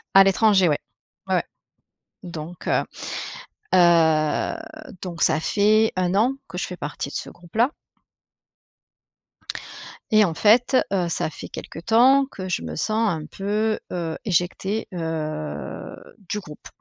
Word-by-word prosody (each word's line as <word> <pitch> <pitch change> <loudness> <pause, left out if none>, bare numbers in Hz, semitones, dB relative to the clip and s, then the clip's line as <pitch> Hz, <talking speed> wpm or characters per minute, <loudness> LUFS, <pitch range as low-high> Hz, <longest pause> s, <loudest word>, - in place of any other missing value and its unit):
À 195 - +10
l'étranger, 195 -2 +4
ouais, 145 - +2 0.5
ouais, - - +2 0.8
donc, 170 -1 -8
heu, - - +2 0.9
heu, 165 -4 +4 0.5
donc 175 -3 -5
ça 155 -1 +3
fait 215 +5 +3
1 180 0 +1
an 230 +7 +3
que 180 - -7
je - - -1
fais 180 - -7
partie 150 -3 -5
de - - -10
ce - - -4
groupe-là 215 - 0 2.4
Et 215 -1 +6
en 170 - -1
fait, 240 - +4 0.2
heu, 180 -3 +1
ça 165 - -1
fait - - -9
quelque - - -8
temps 245 +9 +5
que 185 -1 -6
je 180 - -1
me 80 -2 -6
sens 220 - +1
un 160 -4 -3
peu, 210 +5 -1
heu, 165 -3 -3
éjectée, 190 +3 0
heu, 155 -3 -4 0.3
du 210 - -1
groupe. 150 -6 -11
180 Hz, 135 wpm, -23 LUFS, 160-215 Hz, 2.4 s, À